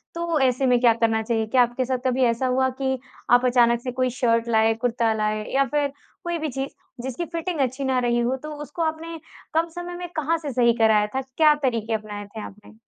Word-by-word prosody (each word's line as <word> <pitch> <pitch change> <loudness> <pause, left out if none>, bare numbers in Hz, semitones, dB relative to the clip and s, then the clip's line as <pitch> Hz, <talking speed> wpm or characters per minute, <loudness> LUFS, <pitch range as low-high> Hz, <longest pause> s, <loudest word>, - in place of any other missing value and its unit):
तो 335 -2 0
ऐसे 260 0 +2
में 250 -1 +4
क्या 235 -2 +6
करना 225 -1 +1
चाहिए? 225 -1 0
क्या 250 +2 +4
आपके 245 +1 +1
साथ 255 0 0
कभी 255 0 +2
ऐसा 235 +2 +1
हुआ 260 +1 +2
कि, 265 -1 0 0.3
आप 245 +1 +5
अचानक 235 -1 +4
से 250 - -4
कोई 255 0 0
शर्ट 230 -1 +1
लाए, 220 0 +4
कुर्ता 230 -1 0
लाए 215 0 -1
या 275 - +4
फिर 290 -1 +1 0.3
कोई 345 -1 -2
भी 310 -1 -2
चीज़ 270 +2 -3 0.3
जिसकी 265 +6 -3
फ़िटिंग 335 -1 -4
अच्छी 265 +1 -1
ना 260 -1 +1
रही 240 -1 +1
हो, 240 +2 +1
तो 305 +4 -8
उसको 295 +3 -7
आपने 325 +1 -3 0.3
कम 325 +1 +2
समय 350 0 -6
में 355 0 -5
कहाँ 320 +1 +1
से 300 -3 -5
सही 235 -1 +4
कराया 215 -2 +4
था, 265 - +1
क्या 300 +4 +3
तरीक़े 230 -3 0
अपनाया 210 -1 -6
थे 215 +2 -9
आपने? 210 +2 -12
255 Hz, 225 wpm, -24 LUFS, 230-285 Hz, 0.3 s, क्या